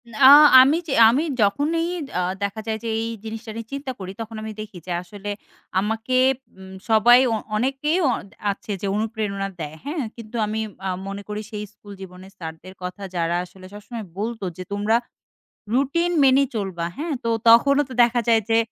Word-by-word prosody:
না, -, -, -8 dB, 0.4 s
আমি 280 Hz, +5 st, +4 dB
যে 280 Hz, -, -2 dB, 0.2 s
আমি 265 Hz, +7 st, +2 dB, 0.2 s
যখনই 295 Hz, +11 st, +1 dB, 0.3 s
আ -, -, +1 dB, 0.2 s
দেখা 200 Hz, +2 st, -3 dB
যায় 220 Hz, -1 st, -1 dB
যে -, -, -4 dB
এই 225 Hz, -, -2 dB, 0.2 s
জিনিসটা 225 Hz, 0 st, -7 dB
নিয়ে 230 Hz, -1 st, -6 dB
চিন্তা 275 Hz, -1 st, -4 dB
করি 190 Hz, -1 st, -6 dB
তখন 225 Hz, 0 st, -7 dB
আমি 220 Hz, -, -5 dB
দেখি 215 Hz, -3 st, -9 dB
যে -, -, -4 dB
আসলে 200 Hz, +3 st, -9 dB, 0.5 s
আমাকে, 225 Hz, +5 st, -2 dB, 0.4 s
উম 190 Hz, 0 st, -11 dB, 0.2 s
সবাই 235 Hz, +3 st, +7 dB
অ -, -, +2 dB, 0.2 s
অনেকেই 270 Hz, +8 st, 0 dB
অ -, -, +3 dB, 0.4 s
আছে 200 Hz, +1 st, -8 dB
যে 200 Hz, -, -2 dB
অনুপ্রেরণা 210 Hz, -2 st, -2 dB
দেয়। 155 Hz, -1 st, -6 dB
হ্যাঁ? 295 Hz, 0 st, -2 dB
কিন্তু 230 Hz, 0 st, -11 dB
আমি 215 Hz, +1 st, -3 dB, 0.3 s
আ -, -, -1 dB, 0.2 s
মনে 200 Hz, +1 st, -5 dB
করি 210 Hz, 0 st, -3 dB
সেই 210 Hz, -1 st, -5 dB
স্কুল 205 Hz, -1 st, -13 dB
জীবনের 185 Hz, 0 st, -11 dB
স্যারদের 160 Hz, +2 st, -9 dB
কথা 185 Hz, +3 st, -6 dB
যারা 170 Hz, 0 st, 0 dB
আসলে 185 Hz, +1 st, -15 dB
সবসময় 215 Hz, +2 st, -8 dB
বলত 225 Hz, +3 st, -3 dB, 0.2 s
যে 185 Hz, -, -5 dB
তোমরা 205 Hz, +2 st, +1 dB, 0.8 s
রুটিন 285 Hz, +7 st, +1 dB
মেনে 270 Hz, +1 st, +5 dB
চলবা, 190 Hz, -6 st, -3 dB
হ্যাঁ? 310 Hz, +2 st, -3 dB
তো -, -, 0 dB, 0.2 s
তখনও 275 Hz, +5 st, +6 dB
তো -, -, -9 dB
দেখা 240 Hz, 0 st, +3 dB
যায় 225 Hz, -1 st, +4 dB
যে 225 Hz, -, +4 dB
220 Hz, 180 wpm, -23 LUFS, 200-245 Hz, 0.8 s, সবাই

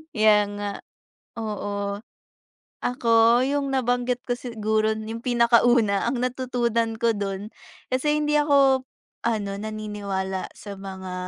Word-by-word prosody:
Kaya 215 Hz, -1 st, +6 dB, 0.2 s
nga, 205 Hz, 0 st, -3 dB, 0.7 s
oo. 205 Hz, -2 st, -3 dB, 0.9 s
Ako, 235 Hz, -1 st, +4 dB
yung 280 Hz, 0 st, 0 dB
nabanggit 245 Hz, -1 st, 0 dB
ko 245 Hz, -, 0 dB
siguro 220 Hz, -2 st, 0 dB
yung 220 Hz, +1 st, -6 dB
pinakauna 235 Hz, -3 st, +4 dB
ang 245 Hz, -1 st, -2 dB
natutunan 240 Hz, -3 st, 0 dB
ko 230 Hz, -1 st, +3 dB
do'n 200 Hz, +1 st, -4 dB, 0.4 s
kasi 295 Hz, +4 st, +1 dB
hindi 300 Hz, 0 st, +2 dB
ako 275 Hz, -3 st, +4 dB, 0.4 s
ano 205 Hz, -4 st, -1 dB
naniniwala 200 Hz, -3 st, -4 dB
sa 200 Hz, -2 st, -9 dB
mga 190 Hz, -1 st, -7 dB
225 Hz, 110 wpm, -24 LUFS, 205-245 Hz, 0.9 s, Kaya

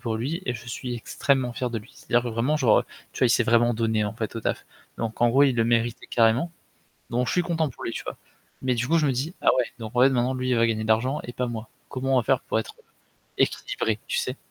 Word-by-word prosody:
pour 115 Hz, -3 st, -2 dB
lui, 150 Hz, +11 st, -3 dB
et 125 Hz, -, 0 dB
je 115 Hz, -, -9 dB
suis 125 Hz, 0 st, -4 dB
extrêmement 125 Hz, +2 st, 0 dB
fier 125 Hz, -1 st, -2 dB
de 115 Hz, -, -2 dB
lui. 105 Hz, -, -14 dB
C'est-à-dire 120 Hz, 0 st, 0 dB
que 120 Hz, -, -3 dB
vraiment 120 Hz, +7 st, +1 dB
genre, 125 Hz, -7 st, +5 dB
heu, -, -, -6 dB, 0.3 s
tu -, -, -9 dB
vois, -, -, +6 dB
il -, -, +2 dB
s'est -, -, +4 dB
vraiment 120 Hz, +1 st, +4 dB
donné 110 Hz, -1 st, +1 dB
en 105 Hz, +2 st, -3 dB
fait 110 Hz, -1 st, -4 dB
au 115 Hz, -, -3 dB
taf. -, -, -2 dB, 0.3 s
Donc 115 Hz, 0 st, -4 dB
en 120 Hz, -, +5 dB
gros, 135 Hz, +4 st, +5 dB
il 135 Hz, -3 st, +4 dB
le 115 Hz, -, +3 dB
méritait 115 Hz, 0 st, 0 dB
carrément. 115 Hz, +8 st, +3 dB, 0.6 s
Donc 125 Hz, +1 st, 0 dB
je -, -, 0 dB
suis 180 Hz, -, +3 dB
content 165 Hz, -3 st, 0 dB
pour 125 Hz, -, -11 dB
lui, -, -, -2 dB
tu -, -, -5 dB
vois. -, -, -6 dB, 0.5 s
Mais 130 Hz, -1 st, +1 dB
du 125 Hz, +2 st, -1 dB
coup, 165 Hz, -, +3 dB
je 155 Hz, -, +2 dB
me -, -, +2 dB
dis: 135 Hz, +7 st, -2 dB
«Ah -, -, +4 dB
ouais, 125 Hz, -, +3 dB
donc 110 Hz, +2 st, -7 dB
ouais, 125 Hz, +2 st, +6 dB
maintenant 125 Hz, 0 st, +1 dB
lui, 130 Hz, 0 st, -2 dB
il -, -, +3 dB
va 115 Hz, 0 st, +4 dB
gagner 110 Hz, -1 st, -1 dB
de 110 Hz, -, -4 dB
l'argent 125 Hz, +7 st, +2 dB
et 120 Hz, -, -7 dB
pas 125 Hz, 0 st, -2 dB
moi. 115 Hz, -2 st, -5 dB, 0.2 s
Comment 135 Hz, 0 st, -1 dB
on -, -, +5 dB
va 120 Hz, -, -1 dB
faire 130 Hz, +1 st, +2 dB
pour 110 Hz, -, -1 dB
être, -, -, -7 dB
heu, -, -, -22 dB, 0.6 s
équilibrés?» 110 Hz, -1 st, 0 dB
tu -, -, -1 dB
sais? 125 Hz, +2 st, -3 dB
120 Hz, 285 wpm, -25 LUFS, 115-130 Hz, 0.6 s, vois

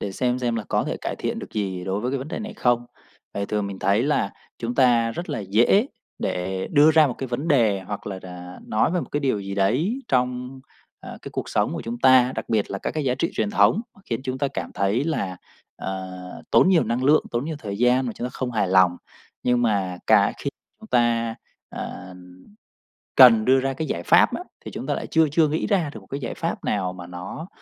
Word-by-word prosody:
để 100 Hz, -, -4 dB
xem 125 Hz, +3 st, 0 dB
xem 120 Hz, -2 st, -1 dB
là 110 Hz, -, -3 dB
có -, -, +1 dB
thể -, -, -3 dB
cải -, -, -4 dB
thiện -, -, -3 dB
được -, -, -9 dB
gì 95 Hz, -4 st, -3 dB
đối 95 Hz, +2 st, -2 dB
với 125 Hz, +3 st, -2 dB
cái 140 Hz, -, -1 dB
vấn 135 Hz, -, -7 dB
đề -, -, -4 dB
này 215 Hz, 0 st, -6 dB
không. 120 Hz, -, +1 dB, 0.5 s
Tại 100 Hz, 0 st, -3 dB
thường 105 Hz, -1 st, -1 dB
mình 100 Hz, -1 st, -6 dB
thấy 100 Hz, +4 st, +2 dB
là 135 Hz, -7 st, 0 dB, 0.3 s
chúng 120 Hz, +1 st, -3 dB
ta 120 Hz, -3 st, +4 dB
rất 170 Hz, +10 st, -6 dB
là -, -, -2 dB
dễ 115 Hz, -, +3 dB, 0.3 s
để 95 Hz, +1 st, -2 dB
đưa 150 Hz, +1 st, +6 dB
ra 155 Hz, -1 st, +6 dB
một 125 Hz, -, -3 dB
cái 135 Hz, -, -3 dB
vấn 130 Hz, +6 st, -3 dB
đề 110 Hz, -, +3 dB
hoặc 100 Hz, +2 st, -7 dB
là 95 Hz, -2 st, -4 dB
rà 90 Hz, -1 st, -9 dB
nói 110 Hz, +8 st, +1 dB
về 180 Hz, -, 0 dB
một -, -, -7 dB
cái 145 Hz, -, -1 dB
điều 130 Hz, -8 st, 0 dB
gì 100 Hz, 0 st, -5 dB
đấy 145 Hz, -, +1 dB
trong, 125 Hz, +1 st, -1 dB, 0.4 s
à, -, -, -9 dB
cái -, -, -8 dB
cuộc -, -, -4 dB
sống -, -, 0 dB
của -, -, -4 dB
chúng 115 Hz, +1 st, -5 dB
ta, 130 Hz, 0 st, +5 dB
đặc -, -, -5 dB
biệt 110 Hz, -3 st, 0 dB
là 100 Hz, -, -3 dB
các -, -, -3 dB
cái 155 Hz, -2 st, -3 dB
giá 125 Hz, -1 st, +1 dB
trị 165 Hz, -, -1 dB
truyền 105 Hz, -2 st, 0 dB
thống 105 Hz, -, +4 dB
mà -, -, -20 dB
khiến 115 Hz, -, -3 dB
chúng 130 Hz, 0 st, -3 dB
ta 140 Hz, -, 0 dB
cảm -, -, -5 dB
thấy 100 Hz, +8 st, +1 dB
là, 100 Hz, -, -2 dB, 0.4 s
ờ, 95 Hz, -1 st, -5 dB, 0.4 s
tốn -, -, +5 dB
nhiều 180 Hz, -4 st, +4 dB
năng 125 Hz, +3 st, -1 dB
lượng, 150 Hz, +2 st, +4 dB
tốn 120 Hz, +2 st, -1 dB
nhiều 155 Hz, -1 st, -4 dB
thời 100 Hz, -5 st, -6 dB
gian 125 Hz, +1 st, +3 dB
mà 120 Hz, -, -3 dB
chúng 120 Hz, -, -6 dB
ta -, -, -6 dB
không 130 Hz, -1 st, -4 dB
hài 105 Hz, -5 st, 0 dB
lòng. 95 Hz, -2 st, +4 dB, 0.5 s
Nhưng 125 Hz, -1 st, +2 dB
mà 95 Hz, -6 st, 0 dB
cả 105 Hz, -2 st, +5 dB
khi 140 Hz, -, -3 dB, 0.3 s
chúng 220 Hz, -, -12 dB
ta, 115 Hz, -, +2 dB, 0.3 s
ờm, 90 Hz, 0 st, -9 dB, 0.7 s
cần 115 Hz, -4 st, +8 dB
đưa 130 Hz, +1 st, +5 dB
ra 135 Hz, +1 st, -1 dB
cái 155 Hz, +4 st, -4 dB
giải 85 Hz, -8 st, -3 dB
pháp -, -, +5 dB
á, -, -, -5 dB, 0.2 s
thì -, -, -6 dB
chúng -, -, -6 dB
ta -, -, +1 dB
lại -, -, -4 dB
chưa 160 Hz, -1 st, +3 dB
chưa 155 Hz, +1 st, +4 dB
nghĩ 155 Hz, +2 st, -1 dB
ra 185 Hz, -8 st, +1 dB
được -, -, -8 dB
một -, -, -19 dB
cái 140 Hz, -, -5 dB
giải 120 Hz, -, -4 dB
pháp -, -, -4 dB
nào 95 Hz, -3 st, -1 dB
mà 90 Hz, -1 st, -9 dB
nó 90 Hz, -, -7 dB
120 Hz, 245 wpm, -23 LUFS, 100-135 Hz, 0.7 s, cần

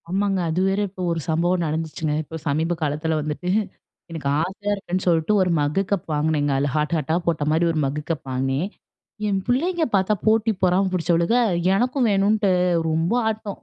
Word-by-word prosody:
ஆமாங்க. 195 Hz, +1 st, 0 dB
அது 160 Hz, +3 st, -1 dB
வேற 195 Hz, +1 st, +1 dB
இப்ப 185 Hz, 0 st, -9 dB
ஒரு 165 Hz, -, -1 dB
சம்பவம் 175 Hz, +2 st, +1 dB
நடந்துச்சுங்க. 155 Hz, 0 st, -2 dB
இப்ப 160 Hz, +2 st, -8 dB
சமீப 160 Hz, +4 st, 0 dB
காலத்தில 155 Hz, +1 st, -1 dB
வந்துட்டு 150 Hz, +4 st, -4 dB, 0.6 s
எனக்கு 160 Hz, -4 st, -4 dB
ஆசையா 195 Hz, +4 st, -3 dB
இருக்குன்னு 185 Hz, -2 st, -3 dB
சொல்ட்டு, 165 Hz, +3 st, +2 dB
ஒரு 185 Hz, -, +2 dB
மக்கு 145 Hz, +6 st, +1 dB
கப் 200 Hz, -3 st, -1 dB
வாங்குனேங்க. 150 Hz, -1 st, +1 dB
அதுல 140 Hz, +1 st, 0 dB
ஹார்ட், 150 Hz, +2 st, 0 dB
ஹார்ட்டா 160 Hz, 0 st, 0 dB
போட்டமாரி 160 Hz, 0 st, +1 dB
ஒரு 160 Hz, -, -1 dB
மக்கு 140 Hz, +2 st, -2 dB
கப் 160 Hz, -4 st, -3 dB
வாங்கினேன். 135 Hz, +6 st, -1 dB, 0.6 s
என் 195 Hz, -2 st, +1 dB
பிள்ளைங்க 330 Hz, +8 st, +1 dB
பார்த்தா 195 Hz, +2 st, +2 dB
போட்டி 220 Hz, 0 st, +3 dB
பொறாமை 185 Hz, +2 st, +3 dB
புடிச்சவளுக. 170 Hz, +4 st, +1 dB, 0.4 s
எனக்கும் 250 Hz, +3 st, +1 dB
வேணுன்ட்டு 200 Hz, +1 st, +2 dB, 0.4 s
ரொம்ப 165 Hz, +5 st, 0 dB, 0.2 s
ஆட்டம். 215 Hz, -2 st, -5 dB
170 Hz, 165 wpm, -22 LUFS, 155-195 Hz, 0.6 s, போட்டி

